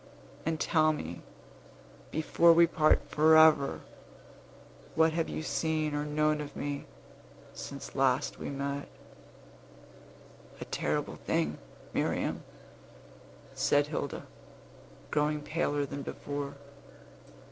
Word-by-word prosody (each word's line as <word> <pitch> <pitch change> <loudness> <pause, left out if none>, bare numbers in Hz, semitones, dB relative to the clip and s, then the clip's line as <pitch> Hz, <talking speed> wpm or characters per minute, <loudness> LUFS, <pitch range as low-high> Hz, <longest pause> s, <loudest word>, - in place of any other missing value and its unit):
And 160 -1 0
tell 155 -1 +3
me, 85 - -6 0.9
before 165 +2 +4
we 170 +1 +7
part 155 -2 +2
forever, 155 -2 +5 1.1
what 160 0 +4
have 165 0 -1
you - - -4
seen 155 -2 -1
or 145 0 -1
known 150 0 +1
of 145 -1 -8
me, 145 0 -4 0.7
since 140 -1 -8
we - - -5
last 135 +1 +1
met?" 140 0 -4 1.7
"A - - -6
terrible - - -2
thing, - - -1 0.3
Miriam," - - -1 1.1
said 145 0 +2
Hilda, 145 -2 -4 0.9
growing 150 0 +1
paler 145 -3 0
than 140 +1 -6
before. 145 0 -5
150 Hz, 100 wpm, -30 LUFS, 140-160 Hz, 1.7 s, we